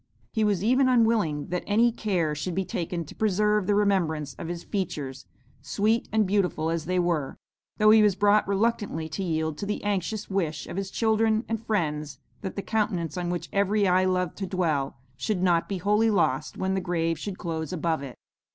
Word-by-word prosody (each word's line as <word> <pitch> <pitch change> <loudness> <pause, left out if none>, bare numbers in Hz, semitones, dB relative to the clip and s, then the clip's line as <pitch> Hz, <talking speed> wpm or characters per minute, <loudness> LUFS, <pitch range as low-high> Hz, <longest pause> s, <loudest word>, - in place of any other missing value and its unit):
He 220 - 0
was 200 -3 +1
even 255 +4 +4
unwilling 220 - +2
that 180 0 -1
any 230 +3 +4
care 185 -9 -1
should 155 +4 -4
be 190 0 0
taken 170 -1 -3
to - - -11
preserve 210 -1 +1
the 205 - +3
remembrance 170 -8 +1
of - - -5
his 175 0 -5
features, 150 -9 -4 0.3
sweet 215 - 0
and 220 -1 +3
beautiful 185 -5 0
as 165 -2 -2
they 185 +2 0
were, 170 -6 0 0.4
though 215 0 +6
he 220 0 +7
was 205 -3 +4
brought 205 +1 +3
reluctantly 200 -5 0
to 190 +5 -4
yield 160 -3 -1
to 200 - -4
the 210 - -3
anxious 205 +1 -2
wish 165 -6 -2
of - - -7
his 195 0 -3
children 220 +1 +1
and 225 0 -3
friends 150 -9 -2 0.2
that 190 - -5
the 200 - -4
countenance 205 -7 -1
on 175 -1 -2
which 175 -1 -3
every 200 +1 +2
eye 185 +1 +3
loved 180 -2 0
to 195 - -3
dwell, 160 -8 -1 0.2
should 190 +1 -1
not 175 -2 +2
be 195 - -2
wholly 210 +5 +2
lost 150 -8 0
when 190 0 -1
the 190 - 0
grave 165 -2 -1
should 200 -2 -5
close 160 -3 -4
above 165 -3 -1
it. 135 -3 -8
185 Hz, 195 wpm, -26 LUFS, 165-210 Hz, 0.4 s, he